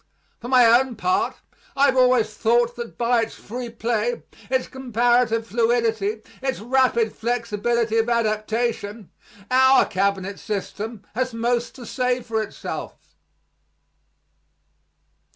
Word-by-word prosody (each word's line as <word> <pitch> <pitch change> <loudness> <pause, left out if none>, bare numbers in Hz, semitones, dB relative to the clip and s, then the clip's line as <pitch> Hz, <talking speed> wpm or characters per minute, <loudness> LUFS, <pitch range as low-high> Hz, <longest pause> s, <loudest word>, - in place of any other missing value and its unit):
For 240 - -8
my 250 -1 +6
own 240 +2 +4
part, 365 - 0 0.4
I 275 +1 +4
have 265 -2 +3
always 250 -4 +3
thought 235 +2 +2
that 235 -2 -7
by 240 0 +2
its 225 - -4
free 240 +2 -7
play, 230 0 -2 0.3
its 260 0 +1
comparative 240 -2 +1
fluidity, 225 -2 0 0.2
its 265 -1 -2
rapid 240 -1 +2
flexibility 230 0 -1
of 225 +1 0
adaptation, 220 -2 -1 0.4
our 260 +1 +6
cabinet 195 0 -1
system 210 +1 -5
has 255 +1 -2
most 235 +1 -1
to 250 - -10
say 250 +1 0
for 225 -2 -2
itself. 215 - -7
235 Hz, 115 wpm, -23 LUFS, 220-250 Hz, 0.4 s, my